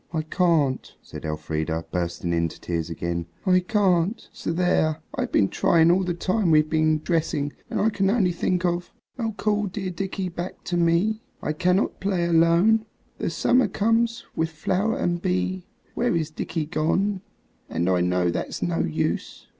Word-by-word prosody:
"I 160 -2 -1
can't," 160 -5 +1
said - - -9
Elfrida, 80 +1 -3
bursting 85 -1 -2
into 85 -1 -1
tears 85 -1 -3
again; 85 0 -3 0.2
"I 185 -1 +5
can't! 185 0 +1
So - - -4
there. 165 -3 +2 0.2
I've - - -2
been 100 - +4
trying 165 - +4
all 185 +2 +3
the 175 -2 -2
time 185 +2 0
we've 155 -1 +5
been 155 -1 +2
dressing, 155 -4 0 0.2
and - - -2
I 220 - +3
can 195 -2 +1
only 200 -4 +2
think 180 +1 0
of 175 0 -1 0.3
"Oh, 225 -3 -2
call 210 -1 +1
dear 190 -1 -4
Dickie 190 +1 -3
back 175 +1 -6
to 175 - -3
me, 175 +6 +2 0.2
I 150 - -1
cannot 180 +5 +1
play 190 -3 0
alone; 170 +7 +4 0.3
The - - -1
summer 255 +1 +3
comes 230 +2 +1
with 160 0 0
flower 190 - -1
and 175 -9 -1
bee, 90 0 -1 0.3
Where - - +1
is 160 -2 -1
dear - - -4
Dickie 165 -2 -2
gone? 185 +5 0 0.5
And 85 - -1
I 90 -1 +3
know 90 0 +1
that's - - -3
no 85 -2 0
use." 80 -1 -2
170 Hz, 170 wpm, -24 LUFS, 130-190 Hz, 0.5 s, I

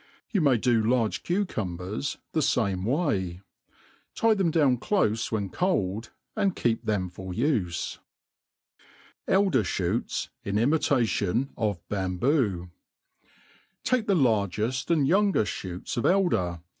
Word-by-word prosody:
You 200 - +2
may 140 -5 +4
do 115 0 +2
large 115 -1 +1
cucumbers 110 - -2
the 160 - +1
fame 100 -9 +1
way. 105 - 0 0.7
Tit 225 -2 +3
thcru 185 -3 +3
down 145 -6 +3
cloiie 115 - +1
wi^o'jcplJ^ 110 - -1 0.3
and 200 -4 +1
ke^p 115 -2 +1
tienji 95 -4 -1
for 95 +1 -8
ufe. 105 - -1 1.3
Elder.'ShootSy 120 - +1
in 100 +1 -1
imitation 120 - +1
of 105 -6 -2
Bamho* 95 - 0 1.1
TAKE 250 -4 +1
«he 195 - +4
largeft 115 - +1
and 155 -5 +3
yoangeft 135 - +1
fbooCsof 120 - -2 0.3
eld^r 90 -5 -1
115 Hz, 105 wpm, -27 LUFS, 95-150 Hz, 1.3 s, may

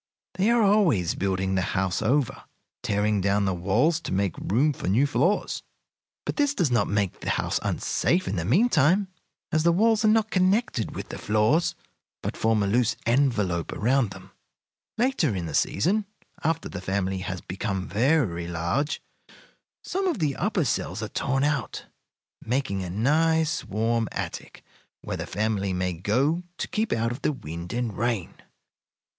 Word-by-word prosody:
They 190 +4 +1
are 235 -1 +4
always 180 - +3
building 95 0 -1
the 95 - +2
house 90 +1 -1
over, 130 +4 0 0.4
tearing 105 0 +1
down 100 +1 +2
the 95 - +1
walls 110 - +2
to - - -6
make 95 0 0
room 135 +9 +2
for - - -6
new 110 +9 +3
floors; 145 - 0 0.6
but - - -3
this 290 -1 +2
does 170 - +1
not 115 -4 +2
make 100 -2 -1
the - - -4
house - - 0
unsafe 180 +2 0
in - - -1
the 85 - -1
mean 170 - +4
time, 185 - +3 0.4
as 155 - +2
the 170 +2 +4
walls 220 +4 +3
are - - +4
not 220 0 +3
connected 185 - +1
with - - -6
the - - -6
floors, 125 +12 +2 0.5
but - - -3
form 110 -2 +2
a - - 0
loose 115 +3 +2
envelope 115 - +1
about 125 +1 +1
them. 95 -1 -12 0.7
"Later 225 - +1
in 90 -2 -3
the 80 - -6
season, 200 - +1 0.4
after 160 +1 0
the 100 - -6
family 95 0 -1
has 95 0 -4
become 95 +1 -4
very 110 - +1
large, 85 - -1 0.8
some 385 +1 -1
of 350 - 0
the 150 -6 0
upper 185 -4 0
cells 120 - -2
are - - -4
torn 135 0 0
out, 145 -6 -1 0.6
making 120 -5 -1
a 90 - -5
nice, 155 - +2
warm 115 +1 0
attic, - - -6 0.4
where - - -4
the - - -5
family 105 -3 -1
may 90 0 -1
go 125 - +1 0.2
to - - -3
keep 220 +1 -1
out 115 +1 +1
of 125 +3 -6
the - - +1
wind 85 - -7
and 120 -4 -2
rain. 115 -4 -1
120 Hz, 170 wpm, -26 LUFS, 95-160 Hz, 0.8 s, are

